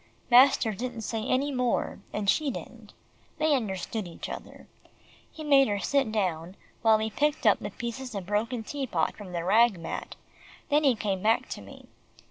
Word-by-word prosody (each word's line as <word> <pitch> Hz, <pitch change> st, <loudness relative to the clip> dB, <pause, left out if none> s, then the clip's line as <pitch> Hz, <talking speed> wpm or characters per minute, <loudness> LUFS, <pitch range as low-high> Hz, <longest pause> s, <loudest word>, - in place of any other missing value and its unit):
Master 245 Hz, -3 st, +6 dB
didn't 235 Hz, +2 st, -5 dB
say 225 Hz, +1 st, -3 dB
any 275 Hz, +3 st, +1 dB
more, 250 Hz, -2 st, -1 dB
and 210 Hz, -1 st, -3 dB
she 295 Hz, +8 st, +2 dB
didn't. 255 Hz, -, -9 dB, 0.4 s
They 310 Hz, -1 st, +3 dB
understood 210 Hz, -3 st, -3 dB
each 170 Hz, -, -8 dB
other. -, -, -9 dB, 0.7 s
He 315 Hz, -, -9 dB
made 275 Hz, -2 st, +5 dB
her 205 Hz, -1 st, 0 dB
sit 270 Hz, +2 st, +1 dB
down, 180 Hz, -4 st, -2 dB, 0.3 s
while 220 Hz, -1 st, +5 dB
he 220 Hz, 0 st, -2 dB
picked 295 Hz, +3 st, 0 dB
up 210 Hz, -, +5 dB
the 205 Hz, -, -5 dB
pieces 235 Hz, +3 st, -6 dB
of 195 Hz, -2 st, -4 dB
broken 225 Hz, +4 st, -1 dB
tea 275 Hz, +3 st, -4 dB
pot 165 Hz, -7 st, 0 dB
from 205 Hz, -4 st, -10 dB
the 170 Hz, -1 st, -3 dB
rag 215 Hz, +2 st, +4 dB
mat, 165 Hz, -, -6 dB, 0.5 s
then 295 Hz, +1 st, +3 dB
he 270 Hz, -4 st, +4 dB
came 200 Hz, -3 st, -2 dB
back 220 Hz, +3 st, +2 dB
to -, -, -6 dB
me. -, -, -13 dB
225 Hz, 180 wpm, -28 LUFS, 200-265 Hz, 0.7 s, Master